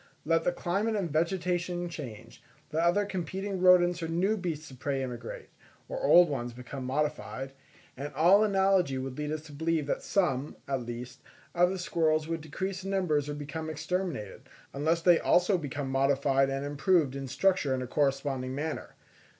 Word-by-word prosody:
Let 165 +1 +2
the - - +3
climate 195 +6 -1
and 185 -6 -1
vegetation 175 +2 0
change, 120 -9 -9 0.3
let 160 +1 0
other 175 +4 +3
competing 190 +1 -4
rodents 180 -1 +5
or 165 - -2
new 180 +6 +1
beasts 160 -7 -4
of 130 - -13
prey 135 -1 -1
immigrate, 130 - -7 0.4
or - - -5
old 175 - +7
ones 120 -5 -3
become 125 +2 -7
modified, 135 -1 -2 0.4
and 145 +3 -5
all 180 +8 +6
analogy 190 -8 +2
would 130 0 -4
lead 150 0 -2
us 155 0 -3
to 155 - -12
believe 160 +1 0
that 145 - -2
some, 150 -7 0
at 135 -4 -2
least, 120 +2 -7 0.3
of 175 0 +4
the 190 - -3
squirrels 155 -2 +1
would 165 -1 -3
decrease 190 +5 -4
in 195 - -4
numbers 155 -7 +1
or 145 - -3
become 155 +2 -5
exterminated, 155 - -4 0.2
unless 160 +4 0
they 175 -2 +6
also 180 +2 +3
become 145 -4 -3
modified 135 0 +2
and 135 +1 -2
improved 145 -1 +2
in 135 -1 -5
structure 180 -2 +2
in 130 - -3
a - - -6
corresponding 135 -2 0
manner. 155 +3 -4
155 Hz, 175 wpm, -29 LUFS, 135-180 Hz, 0.4 s, old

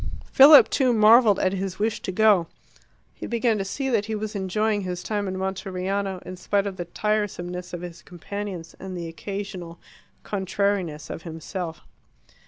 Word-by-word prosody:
Philip, 285 +2 +9
too, 255 -3 +3
marvelled 220 -1 +6
at 185 - +1
his 190 -1 -3
wish 215 +1 -1
to - - -4
go. 200 -3 +4 0.7
He - - -8
began 235 -2 +1
to - - -1
see 270 +8 -3
that 215 -4 +1
he 220 - -2
was 215 +1 -4
enjoying 205 +2 0
his 180 -2 -4
time 205 -2 -2
in 185 0 -3
Monteriano, 190 0 -3
in 185 - -7
spite 200 +2 0
of 195 -2 -4
the 175 - -4
tiresomeness 180 -3 -2
of 175 - -6
his 170 -1 -8
companions 180 -1 -7
and 190 -1 -6
the 170 -1 -5
occasional 185 -1 -6 0.4
contrariness 190 -5 -2
of - - -6
himself. 165 +1 -6
195 Hz, 165 wpm, -24 LUFS, 180-210 Hz, 0.7 s, Philip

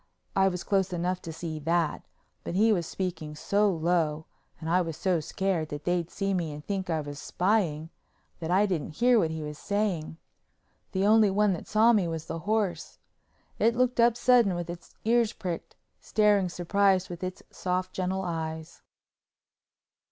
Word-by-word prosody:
I 195 0 +4
was 180 -2 -2
close 195 -2 +1
enough 180 +1 -1
to 165 - -7
see 160 -1 -5
that, 165 +1 0 0.4
but 170 - -4
he 220 +3 +4
was 170 -5 -1
speaking 160 -5 -4
so 205 +6 +2
low 160 -3 0 0.3
and 160 - -6
I 180 +3 +3
was 165 -3 -4
so 185 -3 +1
scared 170 0 -2
that 145 0 -6
they'd 175 -1 0
see 195 -1 -2
me 170 -4 -1
and 150 0 -9
think 195 -2 -3
I 160 -2 0
was 145 -1 -7
spying, 175 -5 0 0.5
that 165 -1 -4
I 190 +4 +4
didn't 165 -6 -3
hear 245 -1 +4
what 165 - +1
he 160 -1 -4
was 150 0 -7
saying. 200 -7 -1 0.7
The 190 +1 0
only 215 0 +6
one 205 0 +2
that 170 - -6
saw 225 +2 +5
me 200 -6 +2
was 165 -1 -4
the 165 - -5
horse. 215 -5 -1 0.6
It 230 +2 +3
looked 250 0 +1
up 235 0 +5
sudden 240 -8 +4
with 175 0 -4
its 175 0 -11
ears 230 -1 +3
pricked, 175 -3 -5 0.2
staring 205 -3 +2
surprised 190 +1 +2
with 175 0 -8
its 185 +1 -5
soft 185 0 -2
gentle 190 +1 -2
eyes. 160 -2 -5
180 Hz, 175 wpm, -28 LUFS, 165-200 Hz, 0.7 s, only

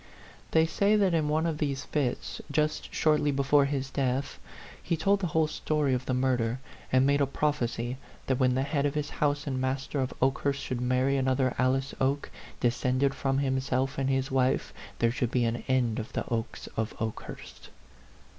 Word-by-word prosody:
They 160 0 +4
say 200 +6 +2
that 195 -4 +3
in 155 -2 +2
one 155 +2 +1
of 160 -2 -1
these 140 -2 -1
fits, 140 -5 -2
just 155 +1 0
shortly 150 -2 +2
be 140 -1 +1
fore 140 +1 +4
his 135 -1 -2
death, 135 0 -1 0.4
he 170 - -1
told 195 +5 +2
the 185 - -1
whole 160 0 +2
story 150 -2 0
of 125 0 -2
the 130 - +1
murder, 125 -2 +1 0.3
and 130 +1 +4
made 140 +1 +3
a 140 - +3
prophecy 130 -4 -1 0.3
that 130 -2 0
when 125 -1 +3
the 130 - +1
head 140 0 0
of 140 - -4
his 150 -1 -2
house 145 0 +1
and 130 -3 -2
master 135 +2 -2
of 130 -1 -1
Oke 135 +1 +2
hurst 140 -1 -1
should 125 -1 -3
marry 130 +2 +2
another 130 -1 +1
Alice 130 +1 +1
Oke, 140 +2 0 0.3
de 120 - +4
scended 130 +3 +1
from 135 0 0
himself 130 -1 0
and 135 0 0
his 135 0 0
wife, 130 -1 +1 0.2
there 115 0 +2
should 125 -1 -1
be 120 0 +1
an 115 +1 -2
end 125 -4 +1
of 110 - -7
the - - -1
Okes 115 -1 -3
of 110 0 -2
Okehurst. 110 -1 -6
135 Hz, 195 wpm, -29 LUFS, 130-145 Hz, 0.4 s, They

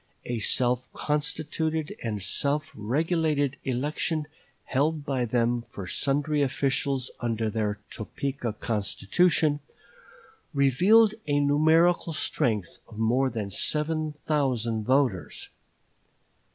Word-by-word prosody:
A 120 -1 -2
self 125 +3 +1
constituted 155 +1 -2
and 105 -4 -3
self 145 +8 -1
regulated 145 - 0
election 150 +4 -1 0.4
held 150 +2 0
by 135 -4 0
them 120 0 +1
for 100 - -7
sundry 145 - +1
officials 135 -1 0
under 115 -2 -1
their 105 -1 -1
Topeka 125 +1 -4
Constitution, 145 - +1 1.0
revealed 190 - +5
a 145 0 +2
numerical 160 +4 +3
strength 115 - -1
of 110 - -13
more 125 +4 +2
than 105 -5 -4
seven 155 - -1
thousand 120 -7 0
voters. 130 -8 0
135 Hz, 100 wpm, -27 LUFS, 115-150 Hz, 1.0 s, revealed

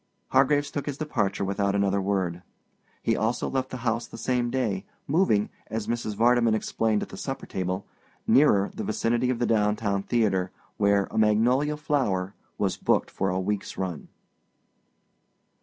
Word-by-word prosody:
Hargraves 145 +2 +3
took 145 - -4
his 140 -1 -3
departure 105 -11 -1
without 100 0 0
another 100 0 +2
word. 95 -3 -1 0.6
He - - +2
also 115 +3 0
left 130 -1 -1
the 130 - -5
house 115 0 0
the - - -10
same 120 0 0
day, 115 -7 -1 0.2
moving, 140 - +2 0.2
as 110 -1 -3
Mrs. 115 -3 -2
Vardeman 115 0 +4
explained 110 0 0
at - - -8
the - - -9
supper - - -5
table, 95 +1 -3 0.4
nearer 105 -8 +4
the - - -5
vicinity 120 +3 0
of 130 - 0
the 120 - 0
downtown 105 -2 +1
theater, 100 -5 +1 0.3
where 100 -1 +3
A - - 0
Magnolia 125 +8 +3
Flower 105 -11 0 0.2
was - - 0
booked - - +1
for 95 - -1
a 90 +1 0
week's 100 +2 -3
run. 90 -5 -4
110 Hz, 155 wpm, -26 LUFS, 100-125 Hz, 0.6 s, Vardeman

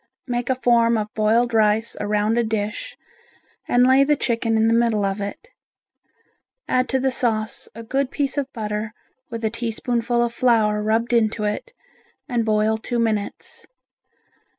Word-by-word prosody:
Make 245 -1 -3
a 260 - +2
form 235 -2 +3
of 215 0 -4
boiled 230 +2 +2
rice 220 +1 +2
around 210 +1 0
a 235 - +2
dish 220 - -3 0.7
and 245 0 +4
lay 260 +2 +5
the 295 +2 +3
chicken 230 -4 0
in 220 0 +3
the 225 - +3
middle 230 -3 +2
of 195 +1 -2
it. 200 - -6 1.2
Add 255 0 +1
to 265 - +1
the 265 0 +1
sauce 220 -3 -1
a 230 - -8
good 270 +3 -1
piece 280 -1 -1
of 280 -2 -2
butter 215 -2 -4 0.4
with 230 -2 -4
a 220 - 0
teaspoonful 235 +1 -1
of 235 -1 -2
flour 220 -4 +2
rubbed 225 +3 0
into 220 -2 +1
it 210 - -3 0.6
and 240 -5 0
boil 215 0 +1
two 240 +2 -3
minutes. 220 -3 -3
230 Hz, 160 wpm, -22 LUFS, 215-245 Hz, 1.2 s, lay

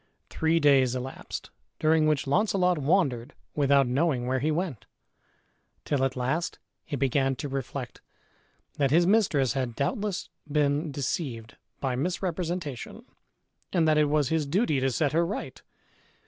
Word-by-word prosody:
Three 160 +1 +2
days 135 -4 +4
elapsed, 130 +1 -6 0.3
during 155 0 +3
which 150 -3 +1
Launcelot 180 +2 +2
wandered 140 -6 +1 0.2
without 140 -1 +4
knowing 130 0 +1
where 130 +1 0
he 150 +4 0
went, 155 - -2 1.0
till 140 -2 0
at 135 -1 0
last 130 +7 -1 0.3
he - - -4
began 135 0 +1
to 145 - -5
reflect 135 -2 -5 0.8
that 140 -2 +3
his 170 +5 +4
mistress 180 - +3
had 130 -4 -2
doubtless 200 - -2 0.2
been 145 +1 +1
deceived 135 - -3 0.2
by 130 -2 -1
misrepresentation, 170 -2 -3 0.7
and 165 -3 +2
that 155 -1 +4
it 150 - +5
was 145 -2 +1
his 160 -3 0
duty 160 - +1
to 135 +1 +1
set 145 +2 0
her 165 +2 +3
right. 185 +5 -5
145 Hz, 140 wpm, -27 LUFS, 135-165 Hz, 1.0 s, it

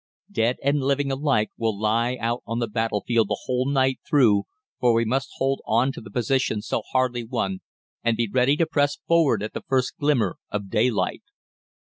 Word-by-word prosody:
"Dead 120 - +1
and 140 +1 +2
living 140 +1 0
alike 135 -6 +1
will 110 -3 -1
lie 115 +3 +1
out 120 +1 -1
on 115 - -2
the 120 - 0
battlefield 115 0 0
the - - -1
whole 130 +1 0
night 135 -2 +2
through, 110 -9 +4 0.3
for 120 -2 +3
we 115 0 +2
must 135 +4 -1
hold 135 0 0
on 120 +5 +2
to 165 - -9
the - - -11
positions 125 -4 0
so - - -1
hardly 125 -2 +1
won, 105 -6 -2 0.4
and 115 -1 +1
be 115 - +1
ready 130 +5 +3
to 165 - +3
press 145 -2 +1
forward 155 -11 +3
at 110 - -5
the - - -5
first 130 -4 0
glimmer 125 -11 +1
of 100 -2 -4
daylight. 115 0 +1
125 Hz, 190 wpm, -24 LUFS, 110-135 Hz, 0.4 s, through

